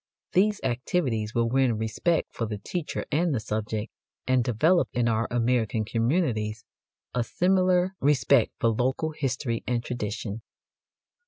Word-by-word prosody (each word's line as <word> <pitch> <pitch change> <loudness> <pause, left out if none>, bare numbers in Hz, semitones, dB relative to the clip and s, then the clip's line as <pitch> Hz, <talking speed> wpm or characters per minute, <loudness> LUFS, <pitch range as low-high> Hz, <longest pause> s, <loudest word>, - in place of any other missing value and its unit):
These 205 +3 +3
activities 120 -3 -1
will 115 0 +2
win 125 -2 +2
respect 110 +10 0
for 115 - -2
the 105 -1 -4
teacher 165 - -4
and 160 -1 +2
the - - 0
subject, 110 0 -3 0.3
and 130 -1 +3
develop 155 - +2
in 120 -1 +1
our 115 0 +1
American 115 -2 +1
communities 115 - 0 0.5
a 125 - +1
similar 185 +4 +2
respect 140 -3 +3
for 115 - +2
local 130 +7 0
history 130 -5 -2
and 120 -1 0
tradition. 110 -2 -4
120 Hz, 135 wpm, -26 LUFS, 110-150 Hz, 0.5 s, These